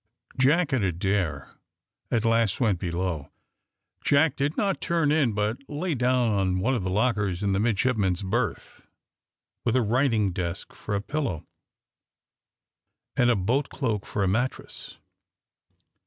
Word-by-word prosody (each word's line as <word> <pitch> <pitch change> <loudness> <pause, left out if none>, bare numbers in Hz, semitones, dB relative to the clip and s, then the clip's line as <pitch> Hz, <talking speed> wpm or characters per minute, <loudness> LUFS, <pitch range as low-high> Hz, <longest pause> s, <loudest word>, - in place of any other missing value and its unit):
Jack 145 +4 +3
and 125 -6 +2
Adair 90 -5 -1 0.6
at 115 -1 +1
last 115 -3 +2
went 105 -8 +2
below. 85 -4 -3 0.7
Jack 145 0 +3
did 140 +2 -1
not 195 -3 0
turn 165 -4 +1
in, 145 -7 +2
but 105 +4 -1
lay 160 +4 -2
down 125 -2 +2
on 95 -3 +1
one 120 +8 +1
of 120 - 0
the 95 - -2
lockers 105 -3 0
in 100 - +1
the 95 - +1
midshipmen's 105 -4 +1
berth, 95 - -3 0.8
with 120 0 +1
a 130 - +3
writing 115 -3 +2
desk 85 0 -4
for 105 - -4
a 100 - -1
pillow, 135 - -3 1.7
and 120 - +3
a 120 - +4
boat 120 +9 0
cloak 110 -8 -2
for 100 - -1
a - - +2
mattress. 120 +7 -3
110 Hz, 140 wpm, -26 LUFS, 95-130 Hz, 1.7 s, a